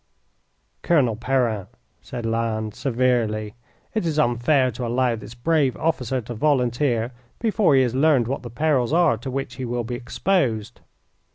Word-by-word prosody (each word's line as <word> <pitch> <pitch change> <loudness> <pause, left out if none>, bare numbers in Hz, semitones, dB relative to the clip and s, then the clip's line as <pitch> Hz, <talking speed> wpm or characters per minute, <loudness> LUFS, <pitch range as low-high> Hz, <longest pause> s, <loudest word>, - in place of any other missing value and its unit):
"Colonel 140 -10 +2
Perrin," 115 -4 0 0.3
said 120 -2 -6
Lannes, 115 -2 -1
severely, 115 -5 0 0.4
"it 220 - 0
is 160 -3 -1
unfair 130 0 +2
to 120 +2 -6
allow 120 0 +1
this 115 +1 -10
brave 140 0 +1
officer 130 -5 -1
to 120 +2 -7
volunteer 125 -2 +1 0.3
before 215 -9 +2
he 130 - +5
has 120 -2 -1
learned 135 -3 +3
what 135 +2 -3
the 120 - -8
perils 135 +1 +1
are 170 -6 +4
to 130 - -6
which 135 +1 -4
he 130 - -4
will 120 0 -2
be 120 +2 -5
exposed." 120 - -1
125 Hz, 155 wpm, -23 LUFS, 115-140 Hz, 0.4 s, he